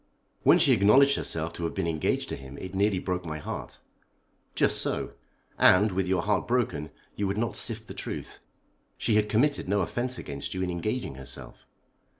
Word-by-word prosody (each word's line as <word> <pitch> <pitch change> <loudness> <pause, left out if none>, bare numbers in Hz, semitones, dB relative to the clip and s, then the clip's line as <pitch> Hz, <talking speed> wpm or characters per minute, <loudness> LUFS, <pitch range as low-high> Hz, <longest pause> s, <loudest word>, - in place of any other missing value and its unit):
"When - - +6
she - - +5
acknowledged 135 +8 +6
herself 80 0 -1
to 85 - -6
have 85 - -2
been - - -1
engaged 80 -2 0
to - - -2
him 65 0 -10
it 95 0 -7
nearly 100 0 +2
broke 90 0 -2
my 75 -2 -5
heart." 75 - -6 0.8
"Just - - +3
so. - - -2 0.5
And, 105 +3 +6
with 95 0 -1
your 95 -2 +1
heart 105 -2 0
broken, 120 -11 0 0.3
you 100 - -1
would 100 +1 -2
not 115 0 -1
sift - - -3
the - - -7
truth. - - -6 0.6
She 115 - 0
had 105 0 +3
committed 125 0 +1
no 100 0 +2
offence 120 +8 -2
against 70 +5 -5
you 95 - -1
in 90 - -1
engaging 100 - -2
herself." 65 -1 -9
95 Hz, 185 wpm, -28 LUFS, 85-110 Hz, 0.8 s, When